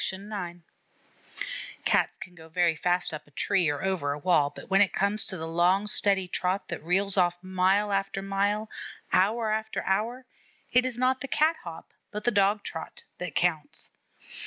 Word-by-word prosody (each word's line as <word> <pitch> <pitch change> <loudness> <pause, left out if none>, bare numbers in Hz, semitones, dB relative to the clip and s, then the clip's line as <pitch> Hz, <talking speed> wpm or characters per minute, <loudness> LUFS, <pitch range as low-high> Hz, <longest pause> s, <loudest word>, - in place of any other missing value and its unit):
LIFE - - 0
III - - -11 0.3
IX 175 +1 -15 1.3
Cats - - +2
can 180 - -10
go 160 -2 -14
very 170 -1 +2
fast 175 +2 0
up 155 -1 -7
a - - -19
tree 175 +3 +1
or 145 +2 -2
over 185 -7 0
a - - -5
wall, 150 -2 +3
but 145 - -12
when 195 +1 +4
it 200 - +3
comes 200 +2 +2
to 185 - -3
the 160 - -4
long 175 +4 +3
steady 195 -2 +2
trot 180 +2 -1
that - - -5
reels 195 +4 +2
off 175 -1 +3
mile 190 +2 +2
after 195 0 -1
mile, 200 +2 0 0.5
hour 215 +4 +3
after 220 0 -2
hour, 230 +7 -1 0.5
it 250 +1 +4
is 245 -2 -2
not 255 +1 +2
the 275 - -3
cat 315 +4 +2
hop, 165 -2 -9 0.2
but 210 0 -5
the 240 - +3
dog 200 0 +3
trot, 160 - -7 0.2
that 180 -3 -5
counts. 165 -4 -1
190 Hz, 185 wpm, -28 LUFS, 175-210 Hz, 1.3 s, when